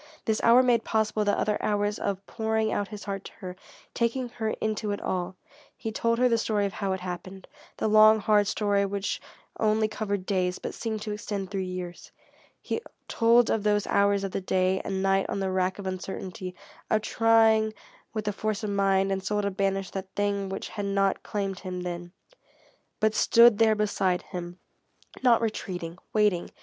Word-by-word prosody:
This 220 Hz, -1 st, +1 dB
hour 240 Hz, +2 st, +6 dB
made 240 Hz, -3 st, +3 dB
possible 215 Hz, -1 st, 0 dB
the 205 Hz, 0 st, +1 dB
other 210 Hz, -1 st, 0 dB
hours 205 Hz, 0 st, 0 dB
of 200 Hz, -1 st, -3 dB
pouring 220 Hz, -1 st, -1 dB
out 205 Hz, -, -1 dB
his 210 Hz, -1 st, -8 dB
heart 195 Hz, -1 st, -4 dB
to -, -, -8 dB
her, 185 Hz, -4 st, -8 dB, 0.4 s
taking 240 Hz, +2 st, -1 dB
her 220 Hz, -2 st, -3 dB
into 215 Hz, -1 st, -2 dB
it 205 Hz, -, -2 dB
all. 185 Hz, 0 st, -3 dB, 0.4 s
He 225 Hz, -, -4 dB
told 230 Hz, +1 st, 0 dB
her 250 Hz, +1 st, +4 dB
the 230 Hz, -2 st, +2 dB
story 210 Hz, -2 st, 0 dB
of 195 Hz, -, -3 dB
how 195 Hz, 0 st, -1 dB
it 190 Hz, -, -4 dB
happened, 185 Hz, +1 st, -7 dB, 0.3 s
the -, -, 0 dB
long, 215 Hz, 0 st, +7 dB
hard 210 Hz, -1 st, +3 dB
story 205 Hz, -1 st, +1 dB
which 200 Hz, 0 st, -2 dB, 0.4 s
only 215 Hz, 0 st, +2 dB
covered 205 Hz, -3 st, -3 dB
days, 185 Hz, -2 st, 0 dB
but -, -, -6 dB
seemed 220 Hz, -2 st, -4 dB
to 215 Hz, -, -4 dB
extend 205 Hz, -2 st, -4 dB
through 195 Hz, -1 st, -1 dB
years. 180 Hz, -1 st, -6 dB, 0.5 s
He -, -, -3 dB, 0.3 s
told 235 Hz, +1 st, +4 dB
of 225 Hz, -, +1 dB
those 210 Hz, -1 st, +1 dB
hours 200 Hz, 0 st, +2 dB
of 195 Hz, -, -3 dB
the -, -, -2 dB
day 185 Hz, 0 st, +1 dB
and 190 Hz, -1 st, -2 dB
night 195 Hz, 0 st, +2 dB
on -, -, -2 dB
the 190 Hz, -1 st, -1 dB
rack 185 Hz, 0 st, 0 dB
of 200 Hz, -, -7 dB
uncertainty, 185 Hz, -1 st, -5 dB, 0.3 s
of 215 Hz, -1 st, +2 dB
trying 225 Hz, -1 st, +4 dB, 0.4 s
with 215 Hz, -1 st, -4 dB
the 210 Hz, -, -1 dB
force 215 Hz, +1 st, -2 dB
of 210 Hz, -, -2 dB
mind 195 Hz, -1 st, +2 dB
and 190 Hz, -1 st, -1 dB
soul 205 Hz, +2 st, -1 dB
to 200 Hz, -, 0 dB
banish 195 Hz, -1 st, -1 dB
that 190 Hz, -1 st, -5 dB
thing 200 Hz, -1 st, 0 dB
which 195 Hz, -, -5 dB
had 205 Hz, -2 st, -4 dB
not 195 Hz, 0 st, +1 dB
claimed 195 Hz, -2 st, -3 dB
him 185 Hz, -1 st, -5 dB
then, 175 Hz, 0 st, -5 dB, 0.9 s
but 215 Hz, 0 st, +2 dB
stood 235 Hz, -1 st, +6 dB
there 220 Hz, -1 st, +5 dB
beside 195 Hz, -4 st, 0 dB
him, 175 Hz, 0 st, -7 dB, 0.6 s
not 240 Hz, -3 st, +5 dB
retreating, 180 Hz, -6 st, -4 dB
waiting. 210 Hz, -5 st, +2 dB
205 Hz, 190 wpm, -27 LUFS, 190-215 Hz, 0.9 s, long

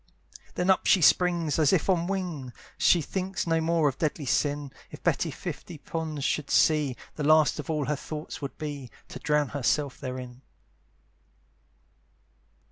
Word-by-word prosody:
Then 180 Hz, +2 st, +3 dB
up 190 Hz, -, +1 dB
she -, -, +6 dB
springs 170 Hz, -2 st, +3 dB
as 150 Hz, -3 st, +4 dB
if 185 Hz, -, +2 dB
on 175 Hz, -3 st, +2 dB
wings; 175 Hz, -10 st, -3 dB, 0.3 s
She 170 Hz, -3 st, +4 dB
thinks 190 Hz, +2 st, -3 dB
no 165 Hz, -1 st, +1 dB
more 165 Hz, -1 st, +2 dB
of 135 Hz, -, -2 dB
deadly 155 Hz, -1 st, -1 dB
sin; 145 Hz, +1 st, 0 dB, 0.2 s
If -, -, -12 dB
Betty -, -, +1 dB
fifty 170 Hz, -, -7 dB
ponds 155 Hz, -1 st, -4 dB
should 150 Hz, 0 st, -1 dB
see, 150 Hz, -5 st, +3 dB, 0.2 s
The 150 Hz, -, -2 dB
last 155 Hz, 0 st, +4 dB
of 150 Hz, -, -6 dB
all 150 Hz, -3 st, 0 dB
her 150 Hz, +3 st, 0 dB
thoughts 155 Hz, +2 st, -7 dB
would 140 Hz, -, -6 dB
be, 145 Hz, -4 st, -6 dB, 0.2 s
To -, -, -8 dB
drown 150 Hz, -2 st, +1 dB
herself 145 Hz, 0 st, 0 dB
therein. 125 Hz, -1 st, -7 dB
150 Hz, 155 wpm, -27 LUFS, 145-165 Hz, 0.3 s, she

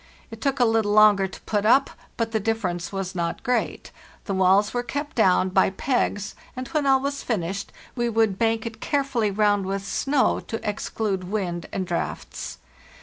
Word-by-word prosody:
It 225 Hz, -1 st, -9 dB
took 275 Hz, +1 st, 0 dB
a 245 Hz, -, +5 dB
little 225 Hz, -2 st, +2 dB
longer 210 Hz, -2 st, +6 dB
to 190 Hz, -, -12 dB
put 205 Hz, -2 st, -1 dB
up, 265 Hz, +6 st, +4 dB, 0.3 s
but 230 Hz, -2 st, -1 dB
the 220 Hz, -, +1 dB
difference 190 Hz, -6 st, -2 dB
was 195 Hz, -1 st, -4 dB
not 170 Hz, -2 st, -3 dB
great. 250 Hz, -2 st, -1 dB, 0.3 s
The 200 Hz, -, -2 dB
walls 190 Hz, +2 st, +3 dB
were 245 Hz, -, 0 dB
kept 285 Hz, +4 st, -5 dB
down 185 Hz, -4 st, +4 dB
by 190 Hz, +1 st, +3 dB
pegs, 205 Hz, -1 st, -1 dB, 0.2 s
and 255 Hz, 0 st, -5 dB
when 300 Hz, -3 st, 0 dB
all 270 Hz, -1 st, +5 dB
was 280 Hz, +1 st, -2 dB
finished 195 Hz, -3 st, -3 dB, 0.2 s
we 240 Hz, -1 st, 0 dB
would 220 Hz, -4 st, +1 dB
bank 225 Hz, 0 st, +1 dB
it 225 Hz, -1 st, -7 dB
care 285 Hz, -2 st, +1 dB
fully 235 Hz, -6 st, 0 dB
round 205 Hz, -1 st, +2 dB
with 195 Hz, 0 st, -3 dB
snow 275 Hz, +5 st, +1 dB
to 225 Hz, -, -6 dB
exclude 205 Hz, -2 st, -2 dB
wind 180 Hz, -4 st, -3 dB
and 190 Hz, -, -2 dB
draughts. 175 Hz, -1 st, -4 dB
215 Hz, 185 wpm, -24 LUFS, 190-240 Hz, 0.3 s, longer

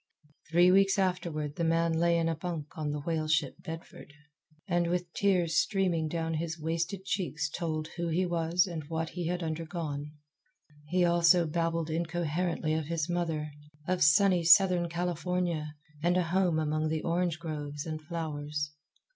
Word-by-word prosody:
Three 175 Hz, +2 st, +5 dB
weeks 195 Hz, +1 st, +4 dB
afterward 170 Hz, -6 st, -1 dB
the 170 Hz, -, 0 dB
man 165 Hz, 0 st, +2 dB
lay 170 Hz, +1 st, +3 dB
in 165 Hz, 0 st, +1 dB
a 165 Hz, -, +1 dB
bunk 160 Hz, -2 st, -5 dB
on 155 Hz, -2 st, -3 dB
the 145 Hz, 0 st, -3 dB
whale 155 Hz, 0 st, -1 dB
ship 155 Hz, 0 st, +1 dB
Bedford, 165 Hz, -2 st, -9 dB, 0.6 s
and 175 Hz, -1 st, +1 dB
with 175 Hz, 0 st, -2 dB
tears 180 Hz, -5 st, +2 dB
streaming 180 Hz, -6 st, +1 dB
down 165 Hz, 0 st, -2 dB
his 160 Hz, +1 st, -3 dB
wasted 170 Hz, +4 st, -2 dB
cheeks 160 Hz, -6 st, -1 dB
told 155 Hz, -1 st, -3 dB
who 170 Hz, 0 st, -1 dB
he 170 Hz, +3 st, +1 dB
was 170 Hz, 0 st, +1 dB
and 170 Hz, -5 st, -5 dB
what 160 Hz, +1 st, -3 dB
he 175 Hz, -2 st, -4 dB
had 175 Hz, 0 st, -2 dB
undergone. 155 Hz, -2 st, -4 dB, 0.7 s
He 180 Hz, +2 st, +2 dB
also 170 Hz, 0 st, +5 dB
babbled 165 Hz, 0 st, -1 dB
incoherently 165 Hz, 0 st, -1 dB
of 160 Hz, -1 st, -1 dB
his 165 Hz, -2 st, -1 dB
mother, 160 Hz, -3 st, -2 dB, 0.4 s
of 185 Hz, -1 st, 0 dB
sunny 180 Hz, +4 st, +5 dB
Southern 175 Hz, 0 st, +6 dB
California, 175 Hz, -2 st, -2 dB, 0.3 s
and 175 Hz, +2 st, +2 dB
a 180 Hz, -, +3 dB
home 175 Hz, -1 st, +1 dB
among 155 Hz, 0 st, 0 dB
the 155 Hz, 0 st, -2 dB
orange 170 Hz, -1 st, 0 dB
groves 150 Hz, -3 st, -5 dB
and 155 Hz, -1 st, -4 dB
flowers. 150 Hz, -2 st, -4 dB
165 Hz, 160 wpm, -30 LUFS, 155-175 Hz, 0.7 s, Southern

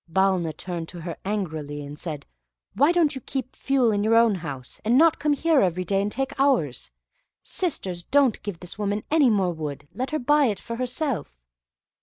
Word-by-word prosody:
Balna 190 Hz, -2 st, +2 dB
turned 170 Hz, -3 st, -5 dB
to 175 Hz, -2 st, -8 dB
her, 170 Hz, 0 st, -5 dB
angrily, 155 Hz, -8 st, -3 dB
and 145 Hz, +1 st, -8 dB
said, 150 Hz, -4 st, -5 dB, 0.5 s
"Why 285 Hz, +5 st, +4 dB
don't 340 Hz, -4 st, +3 dB
you 265 Hz, -, -6 dB
keep 260 Hz, +1 st, -5 dB
fuel 265 Hz, -4 st, +2 dB
in 205 Hz, -1 st, 0 dB
your 220 Hz, +2 st, +3 dB
own 230 Hz, -1 st, +5 dB
house, 135 Hz, -6 st, -6 dB
and 235 Hz, +4 st, +3 dB
not 325 Hz, +1 st, +5 dB
come 300 Hz, 0 st, +2 dB
here 315 Hz, +1 st, +3 dB
every 185 Hz, -1 st, 0 dB
day 195 Hz, +2 st, +1 dB
and 205 Hz, +1 st, -2 dB
take 270 Hz, +3 st, -2 dB
ours? 240 Hz, -, +1 dB, 0.5 s
Sisters, 195 Hz, -, -2 dB
don't 275 Hz, +5 st, +2 dB
give 200 Hz, -5 st, -6 dB
this 180 Hz, +3 st, -6 dB
woman 205 Hz, 0 st, -1 dB
any 300 Hz, -5 st, +5 dB
more 190 Hz, -5 st, +2 dB
wood; 145 Hz, -3 st, -6 dB
let 255 Hz, +2 st, -3 dB
her 310 Hz, -, -1 dB
buy 295 Hz, +2 st, +3 dB
it 205 Hz, -4 st, -2 dB
for 230 Hz, -1 st, -6 dB
herself." 250 Hz, -, -2 dB
210 Hz, 195 wpm, -25 LUFS, 170-270 Hz, 0.5 s, own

